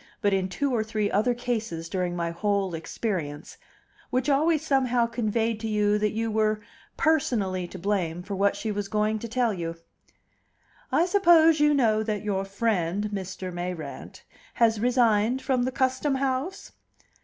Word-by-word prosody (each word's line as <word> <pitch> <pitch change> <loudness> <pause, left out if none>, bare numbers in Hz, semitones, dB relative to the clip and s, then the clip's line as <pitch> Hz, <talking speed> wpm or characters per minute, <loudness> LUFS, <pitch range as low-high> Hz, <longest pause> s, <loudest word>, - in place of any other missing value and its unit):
but 205 -1 +1
in 190 -1 0
two 280 +7 -1
or 220 - +1
three 215 -1 -1
other 230 +5 +2
cases 225 -9 -3
during 180 -1 -2
my 170 -1 -2
whole 200 +1 -1
experience), 165 -3 -4 0.5
which 255 +3 +1
always 310 +2 +2
somehow 255 -4 +2
conveyed 230 -1 -1
to 225 - -4
you 210 -1 +2
that 210 0 +2
you 225 +1 -2
were 215 0 +1 0.4
personally 205 - +1
to 190 - -9
blame 180 -3 -1
for 200 - -6
what 200 +1 +2
she 220 - -3
was 205 -1 -3
going 215 +1 0
to 235 - -6
tell 235 -1 +1
you. 165 -3 -4 1.2
"I 340 - +3
suppose 340 -5 +5
you 295 0 +4
know 220 -5 +3
that 215 -1 -2
your 195 -2 -1
friend, 200 -1 -1
Mr. 190 -1 -5
Mayrant, 175 -4 -6 0.3
has 225 -2 +3
resigned 240 0 +2
from 260 -1 0
the 260 - -1
Custom 260 +2 0
House?" 270 +7 -2
215 Hz, 160 wpm, -26 LUFS, 195-250 Hz, 1.2 s, suppose